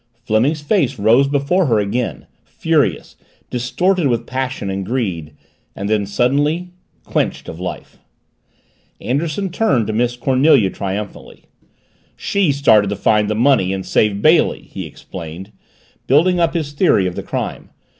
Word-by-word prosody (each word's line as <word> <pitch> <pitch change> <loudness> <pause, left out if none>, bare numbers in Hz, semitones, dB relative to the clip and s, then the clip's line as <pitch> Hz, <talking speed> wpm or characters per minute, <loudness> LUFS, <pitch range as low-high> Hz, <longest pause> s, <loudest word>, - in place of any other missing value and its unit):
Fleming's 125 +8 +1
face 145 - 0
rose 115 +6 +4
before 145 +6 +1
her 115 -4 +2
again, 105 +4 -2 0.2
furious, 150 - -1 0.4
distorted 170 +8 0
with 120 -2 -1
passion 130 -4 -3
and 95 0 -3
greed 95 - -3 0.4
then, 100 0 -1
suddenly, 145 - 0 0.3
quenched - - -2
of 80 - -8
life. 90 - -7 1.0
Anderson 155 - -2
turned 140 - +1
to 110 - -3
Miss 120 +2 0
Cornelia 130 -5 +3
triumphantly. 100 +1 -6 0.7
"She 195 -6 0
started 110 -7 +4
to 100 - -2
find 105 +1 +2
the 110 - 0
money 115 -5 +3
and 95 -1 -4
save 100 +2 +1
Bailey," 160 +2 +3
he - - -7
explained, 90 +3 -9 0.6
building 175 +7 +3
up 170 0 +1
his 155 -4 -2
theory 145 - +2
of 90 - -2
the - - -5
crime. - - -5
125 Hz, 135 wpm, -18 LUFS, 100-145 Hz, 1.0 s, rose